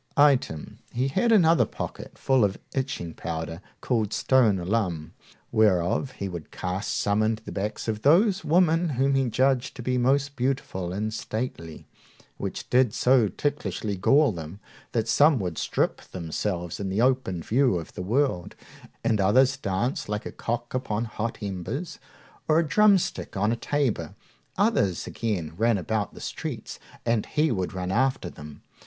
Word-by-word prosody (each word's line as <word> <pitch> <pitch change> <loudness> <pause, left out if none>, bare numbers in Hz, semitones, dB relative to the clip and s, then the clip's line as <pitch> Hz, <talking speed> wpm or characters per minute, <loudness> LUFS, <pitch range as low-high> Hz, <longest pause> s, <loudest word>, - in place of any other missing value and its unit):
Item, 135 - +2
he 130 +3 0
had 235 - +2
another 170 -6 +5
pocket - - -7
full 130 -3 +3
of 100 -2 +1 0.2
itching 130 - -3
powder, 80 +1 -5 0.2
called 110 -4 0
stone 120 -7 +3
alum, 90 -4 -2 0.4
whereof 105 +4 +2
he 100 - -4
would 85 -4 -7
cast 95 +2 -3
some 100 +1 +1
into 110 0 0
the - - -8
backs 105 +3 -3
of 110 -1 -2
those 185 - +4
women 170 +1 +3
whom 135 +1 +3
he 135 -2 +2
judged 130 +1 +1
to 125 - -7
be 125 +1 0
most 140 +3 +1
beautiful 125 -9 -2
and 105 +3 -2
stately, 110 -9 -5 0.5
which - - -5
did 125 -2 +3
so 125 -3 +4
ticklishly 105 -6 -2
gall 140 +9 +4
them, 85 +1 -8 0.3
that 115 -2 0
some 150 0 +5
would 90 -7 -3
strip - - 0
themselves 85 0 -4
in 100 -1 -3
the 95 +3 -1
open 125 -9 +1
view 125 -4 +2
of 80 - -7
the - - -6
world, 110 -2 0 0.5
and 110 -3 +2
others 130 +7 +4
dance 120 - -2
like 105 0 -3
a - - -5
cock 120 +1 -4
upon 115 -3 -1
hot 115 +1 -4
embers, 105 - -4 0.5
or 155 - +4
a 165 -1 +2
drumstick 200 - +2
on 105 +3 +2
a - - +1
tabor. 120 - -1 0.4
Others, 185 - +1
again, 95 -9 -3
ran 115 0 +3
about 105 +2 -2
the - - -10
streets, - - -6 0.3
and 115 -2 +1
he 150 0 +1
would 95 -5 -1
run 90 -1 -3
after 120 -5 +1
them. 75 -1 -11
115 Hz, 160 wpm, -26 LUFS, 95-135 Hz, 0.5 s, another